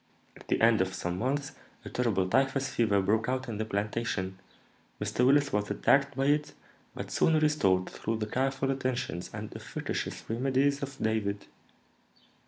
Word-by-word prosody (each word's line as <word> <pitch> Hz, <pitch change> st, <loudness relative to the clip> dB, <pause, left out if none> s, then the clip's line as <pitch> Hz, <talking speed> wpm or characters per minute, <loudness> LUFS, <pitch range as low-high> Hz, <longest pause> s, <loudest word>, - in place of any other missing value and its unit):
At -, -, -15 dB
the -, -, +1 dB
end 115 Hz, -3 st, +5 dB
of 95 Hz, 0 st, -1 dB
some 90 Hz, +1 st, -3 dB
months 140 Hz, +3 st, -1 dB, 0.3 s
a -, -, -5 dB
terrible 105 Hz, -7 st, +1 dB
typhus 135 Hz, +5 st, +1 dB
fever 100 Hz, -4 st, +2 dB
broke 110 Hz, +4 st, +1 dB
out 130 Hz, 0 st, -1 dB
in 110 Hz, -3 st, -4 dB
the 110 Hz, -, -1 dB
plantation. 100 Hz, -2 st, -2 dB, 0.6 s
Mr. 125 Hz, -, 0 dB
Willis 140 Hz, +2 st, +4 dB
was 105 Hz, 0 st, 0 dB
attacked 140 Hz, +7 st, +2 dB
by 135 Hz, -, +1 dB
it, 150 Hz, +1 st, +1 dB, 0.4 s
but -, -, -6 dB
soon 160 Hz, -1 st, +3 dB
restored 100 Hz, -13 st, +2 dB
through 110 Hz, +1 st, -3 dB
the 110 Hz, -, -2 dB
careful 135 Hz, +3 st, 0 dB
attentions 130 Hz, -9 st, -2 dB
and -, -, -7 dB
efficacious -, -, -4 dB
remedies 135 Hz, +4 st, +1 dB
of 140 Hz, -1 st, -5 dB
David. 105 Hz, -2 st, -1 dB
120 Hz, 160 wpm, -29 LUFS, 105-135 Hz, 0.6 s, end